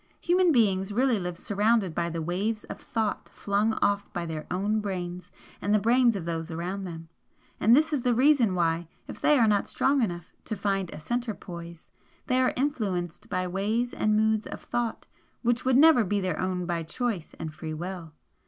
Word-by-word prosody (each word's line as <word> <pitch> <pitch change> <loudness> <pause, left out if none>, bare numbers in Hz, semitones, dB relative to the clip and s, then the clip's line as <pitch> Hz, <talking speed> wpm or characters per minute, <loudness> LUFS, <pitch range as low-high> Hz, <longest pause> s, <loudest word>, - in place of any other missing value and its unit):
Human 360 0 +3
beings 200 -6 +2
really 245 0 +2
live 180 -2 -4
surrounded 205 -2 +1
by 170 +1 -1
the 165 -1 -3
waves 200 +6 -2
of - - -9
thought 220 -2 -2
flung 205 +2 0
off 205 0 +1
by 175 - -3
their 160 -2 -5
own 205 +4 0
brains 180 -3 -5 0.3
and 205 +2 +2
the - - +4
brains 235 +2 +4
of 185 -4 -4
those 165 0 -3
around 180 +4 -4
them, 165 -2 -8 0.5
and 225 +4 +6
this 310 +2 +3
is 285 - +1
the 245 -1 +2
reason 255 -6 +4
why, 165 -1 0 0.2
if - - -9
they 300 - +5
are 235 - +5
not 205 -1 +2
strong 275 0 +2
enough 175 -6 -3
to 220 - -3
find 195 -2 -1
a 150 - -8
centre 240 +6 -2
poise, 170 -2 -10 0.3
they 255 0 +2
are 255 - +3
influenced 205 - -2
by 185 0 -1
ways 215 +6 -1
and 215 0 +1
moods 220 0 +2
of - - -7
thought 240 -2 -2 0.4
which 240 +1 +1
would 260 -1 +4
never 300 -4 +7
be 205 +1 0
their 185 -1 -2
own 185 -1 -1
by 170 -1 -1
choice 190 +1 -3
and 160 -1 -6
free 155 0 -6
will. 175 0 -6
200 Hz, 195 wpm, -27 LUFS, 175-235 Hz, 0.5 s, never